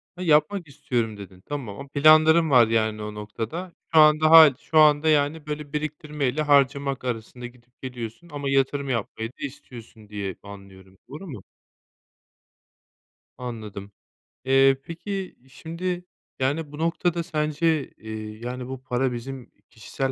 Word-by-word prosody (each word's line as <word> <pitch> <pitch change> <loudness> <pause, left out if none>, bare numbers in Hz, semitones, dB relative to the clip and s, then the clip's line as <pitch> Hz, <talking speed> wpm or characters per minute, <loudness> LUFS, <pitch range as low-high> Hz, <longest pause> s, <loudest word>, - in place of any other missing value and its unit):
Ha, 180 - -9
yapmak 160 +2 +2
istiyorum, 120 -6 -3
dedin. 95 -2 -12
Tamam. 140 -2 -6
Planların 155 +3 +5
var, 125 -5 +6
yani, 110 -1 0
o 105 - -6
noktada 115 - -6 0.2
şu 160 - +7
an 155 0 +6
daha 160 0 +9
şu 160 - -3
anda, 150 0 +5
yani, 150 +1 +1
böyle 150 -1 -6
biriktirmeyle 150 -2 -2
harcamak 140 -2 +2
arasında 120 0 -5
gidip 120 0 -22
geliyorsun 125 +5 -7
ama 145 -1 -3
yatırım 135 +1 0
yapmayı 115 -2 -3
da - - -50
istiyorsun 115 -5 -12
diye 100 -3 -5
anlıyorum, 95 -2 -13
doğru 155 +7 -9
mu? 125 - -9 1.9
Anladım. 110 -5 -7 0.5
Eee, 135 0 +5
peki, 190 +4 -6
şimdi, 175 +5 -5 0.3
yani, 145 +3 -1
bu 145 - -9
noktada 170 +1 0
sence, 155 -1 0
eee, 110 -1 -8
yani, 125 +1 -6
bu 130 0 -7
para 130 0 -1
bizim 125 +1 -8 0.2
kişisel 130 +4 -4
135 Hz, 135 wpm, -24 LUFS, 115-155 Hz, 1.9 s, daha